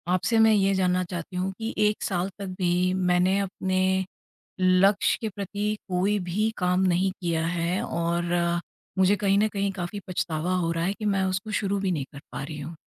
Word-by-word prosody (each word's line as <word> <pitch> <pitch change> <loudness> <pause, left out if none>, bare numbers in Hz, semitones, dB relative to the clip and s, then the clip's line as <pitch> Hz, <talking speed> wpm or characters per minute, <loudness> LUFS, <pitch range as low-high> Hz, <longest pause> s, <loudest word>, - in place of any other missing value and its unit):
आपसे 225 +5 +1
मैं 220 - +5
ये 195 -1 +3
जानना 185 -1 +2
चाहती 175 +1 -5
हूँ 185 +1 -1
कि 225 +1 -3 0.2
1 210 - -4
साल 185 0 -1
तक 200 - -4
भी 180 +1 +2 0.2
मैंने 180 +2 +3
अपने 190 -1 -1 0.8
लक्ष्य 185 +2 +4
के 225 - -2
प्रति 205 +2 -2
कोई 190 +3 +1
भी 215 +5 +1
काम 180 0 +2
नहीं 185 +2 +2
किया 165 -1 0
है 170 +2 -1
और 170 +1 -1 0.7
मुझे 190 +2 +4
कहीं 195 0 +4
न 215 +1 +3
कहीं 200 0 0
काफ़ी 175 +4 -4
पछतावा 175 -1 -1
हो 170 -2 0
रहा 165 0 -1
है 195 - +1
कि 215 - -5
मैं 190 - +1
उसको 200 +4 -3
शुरू 200 0 0
भी 185 - +2
नहीं 150 -6 -2
कर 140 - -9
पा - - -4
रही 150 +1 -7
हूँ। 155 +4 -7
185 Hz, 195 wpm, -26 LUFS, 175-200 Hz, 0.8 s, मैं